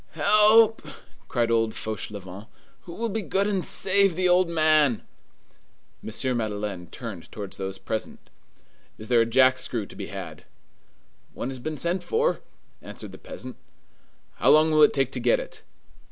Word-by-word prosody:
"Help!" 215 +1 +5 0.5
cried 120 -2 0
old 115 -1 +1
Fauchelevent. 100 -2 -7 0.4
"Who 170 - -9
will 230 +5 -3
be 220 +1 -2
good 195 0 0
and 200 -3 -1
save 195 -2 +2
the 185 +1 +1
old 180 0 +3
man?" 155 -7 +3 1.0
M. 125 +3 -2
Madeleine 105 -5 -4
turned 105 -4 -9
towards 100 -3 -8
those 95 0 -5
present:— 110 +2 -6 0.7
"Is 110 - -10
there 120 -2 +4
a 115 - +1
jack 130 +2 +4
screw 115 -4 -3
to - - -14
be - - -6
had?" - - -8 0.9
"One - - -4
has 130 -1 -5
been 155 +4 -5
sent 175 +5 -1
for," 465 - 0 0.4
answered - - -9
the - - -12
peasant. - - -10 0.8
"How - - +3
long 155 +1 +5
will 155 0 +4
it 150 - +7
take 135 -2 +1
to 130 - -3
get - - +2
it?" - - -9
130 Hz, 160 wpm, -25 LUFS, 110-180 Hz, 1.0 s, it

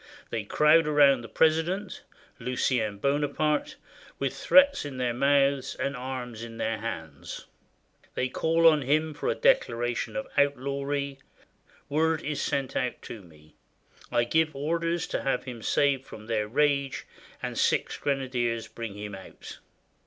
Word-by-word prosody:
They 110 -3 -3
crowd 150 +7 +4
around 140 -4 +5
the 115 - -9
president 165 +5 +1 0.4
(Lucien 120 -3 0
Bonaparte) 150 - 0 0.4
with - - -2
threats 280 0 +5
in 140 -3 -6
their 125 -2 0
mouths, 140 +1 +2
and 140 0 -2
arms 125 -3 -5
in 115 -1 -8
their 115 -1 -1
hands; 80 -10 -6 0.7
they 130 - 0
call 165 +5 +1
on 155 -2 +5
him 155 +4 +1
for - - -3
a - - +1
declaration 120 - +1
of 110 - -2
outlawry; 140 0 0 0.7
word 160 +1 +1
is 150 0 -2
sent 135 -2 -2
out 125 -1 -1
to 110 - -8
me; 75 -4 -19 0.6
I 120 - +3
give 155 +5 +1
orders 165 +4 -1
to - - -3
have 135 - 0
him 120 -3 -8
saved 135 +2 +1
from 110 - -10
their 110 -2 -1
rage, 140 +2 +1 0.4
and - - -3
six - - +1
grenadiers 125 -5 -1
bring 110 -2 -7
him 105 0 -6
out. 95 -1 -10
135 Hz, 145 wpm, -27 LUFS, 115-150 Hz, 0.7 s, around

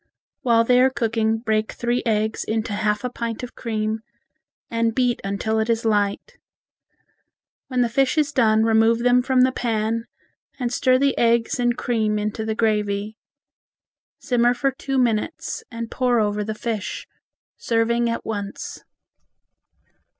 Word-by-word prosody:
While 230 -2 +4
they 250 +2 +4
are 260 - +5
cooking 225 -3 0
break 220 -1 -1
three 240 +1 -1
eggs 220 0 0
into 220 -1 -2
half 210 +1 0
a 250 - -1
pint 230 -1 -4
of 250 - -7
cream, 220 -1 -2 0.7
and 230 -1 0
beat 245 -2 +1
until 200 +3 -1
it 220 +1 -1
is 230 0 0
light. 210 - 0 1.3
When 255 -2 0
the 240 - +3
fish 265 +5 +1
is 295 -2 +2
done 220 -5 +3
remove 225 +1 +3
them 245 0 +4
from 255 0 +2
the 260 +1 +4
pan 230 -2 -1 0.5
and 245 -1 -2
stir 255 0 +3
the 275 +1 +2
eggs 235 +1 +2
and 240 -1 +1
cream 220 -3 0
into 210 +1 -2
the 220 0 -2
gravy. 210 -1 0 1.0
Simmer 245 0 +2
for 275 +3 +1
two 270 +1 -3
minutes, 240 +4 -1
and 230 -1 -6
pour 250 -2 +1
over 210 -1 0
the 215 +1 -4
fish, 215 -2 -4 0.5
serving 235 +1 +1
at 230 - -3
once. 205 -2 -5
230 Hz, 150 wpm, -22 LUFS, 220-245 Hz, 1.3 s, are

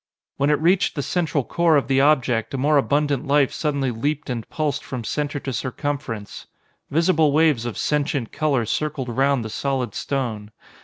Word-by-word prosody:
When 140 +1 +2
it 150 - +3
reached 180 +4 +2
the 145 - -2
central 160 -2 0
core 170 +2 +2
of 140 - 0
the 135 0 +3
object, 135 -4 +2
a - - -2
more 145 +3 +3
abundant 145 -1 +1
life 140 -1 +3
suddenly 140 -4 -1
leaped 145 +5 -2
and 115 -4 -5
pulsed 150 -2 -2
from 125 -3 -5
center 145 +4 -2
to 135 - -4
circumference. 130 -5 -4 0.4
Visible 160 -1 +3
waves 150 -6 +3
of 120 - -5
sentient 145 -5 -1
color 145 -6 0
circled 130 +3 -2
round 135 0 +1
the - - -4
solid 135 -1 -2
stone. 115 -7 -3
140 Hz, 170 wpm, -22 LUFS, 125-150 Hz, 0.4 s, it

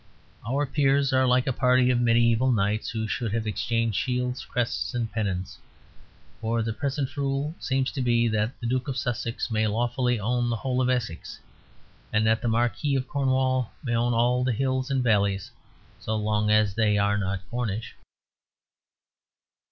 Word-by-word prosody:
Our 140 +3 +1
peers 140 0 +2
are 130 0 +3
like 125 0 +3
a 135 - 0
party 125 0 +3
of 120 - +2
mediæval 120 +1 +3
knights 105 +1 0
who 110 -1 -3
should 115 -1 -2
have 115 -1 -1
exchanged 115 0 0
shields, 125 0 -2
crests, 125 +1 -2
and 115 -2 -2
pennons. 100 -4 -3 0.8
For 115 0 -1
the 115 0 -2
present 140 +2 -3
rule 140 +2 -1
seems 130 0 0
to 135 - -3
be 120 -1 +2
that 110 +2 -1
the 120 - -6
Duke 130 +3 -1
of 135 -1 -3
Sussex 120 0 -3
may 110 0 +1
lawfully 120 +2 0
own 120 +3 0
the 115 - 0
whole 130 +2 -1
of 130 - +1
Essex; 115 -10 -3 0.7
and 105 +1 +2
that 110 0 +2
the - - -2
Marquis 120 +5 +1
of 130 -1 -1
Cornwall 130 -3 0
may 120 -4 -2
own 120 0 +1
all 125 +2 +2
the 125 -1 +1
hills 130 +2 -1
and 135 -2 +1
valleys 100 -4 +1 0.5
so 110 - -3
long 105 0 0
as 105 -2 +3
they 105 -1 +2
are 100 0 +2
not 95 -1 -3
Cornish. 115 -2 -3
120 Hz, 170 wpm, -26 LUFS, 110-130 Hz, 0.8 s, are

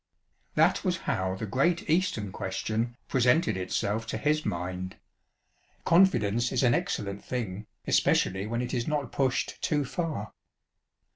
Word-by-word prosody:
That - - +3
was 185 -3 +1
how 95 -8 0
the 100 - -4
great 140 - +1
"Eastern 155 - +1
Question" 110 +6 -2
presented 125 - +3
itself 105 +4 -1
to - - -2
his 150 +1 +1
mind. 90 +1 -3 0.9
Confidence 120 - +4
is 130 0 +1
an 120 -2 +5
excellent 100 -3 -2
thing, 110 -5 -4 0.2
especially 95 +2 +2
when 115 +2 -1
it 125 - -4
is 120 -2 -1
not 145 -4 -1
pushed 135 -2 0
too 150 -3 +1
far. 150 - -3
120 Hz, 135 wpm, -28 LUFS, 100-145 Hz, 0.9 s, an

